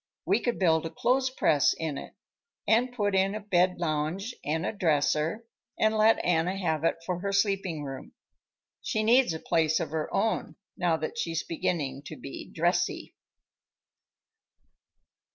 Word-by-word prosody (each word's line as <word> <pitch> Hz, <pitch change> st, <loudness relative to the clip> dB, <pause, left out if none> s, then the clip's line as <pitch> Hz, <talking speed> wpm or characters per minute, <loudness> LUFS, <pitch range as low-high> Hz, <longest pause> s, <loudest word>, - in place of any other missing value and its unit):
We 195 Hz, +6 st, +3 dB
could 240 Hz, 0 st, -1 dB
build 165 Hz, -3 st, +2 dB
a -, -, -6 dB
clothes 260 Hz, +8 st, +1 dB
press 150 Hz, -, +3 dB
in 160 Hz, -3 st, -3 dB
it, -, -, -8 dB, 0.5 s
and 240 Hz, +3 st, +3 dB
put 205 Hz, -5 st, -1 dB
in 195 Hz, +1 st, +2 dB
a -, -, -3 dB
bed 185 Hz, -3 st, +2 dB
lounge 170 Hz, +7 st, -2 dB
and 160 Hz, +2 st, -1 dB
a -, -, 0 dB
dresser 160 Hz, +2 st, +1 dB, 0.3 s
and 220 Hz, 0 st, +2 dB
let 220 Hz, +1 st, +5 dB
Anna 175 Hz, +2 st, +1 dB
have 160 Hz, -5 st, -1 dB
it 165 Hz, -, +2 dB
for 180 Hz, 0 st, -2 dB
her 200 Hz, +2 st, -2 dB
sleeping 195 Hz, -6 st, 0 dB
room. 135 Hz, -1 st, -8 dB, 0.7 s
She 215 Hz, -, -1 dB
needs 240 Hz, 0 st, +4 dB
a 160 Hz, -, -4 dB
place 160 Hz, -1 st, +1 dB
of 165 Hz, -3 st, -3 dB
her 155 Hz, -1 st, -3 dB
own, 220 Hz, +2 st, -1 dB, 0.2 s
now 175 Hz, -3 st, +1 dB
that 160 Hz, +9 st, -4 dB
she's 165 Hz, -5 st, -1 dB
beginning 145 Hz, -5 st, -2 dB
to -, -, -7 dB
be -, -, -8 dB
dressy." -, -, 0 dB
175 Hz, 155 wpm, -28 LUFS, 160-210 Hz, 0.7 s, let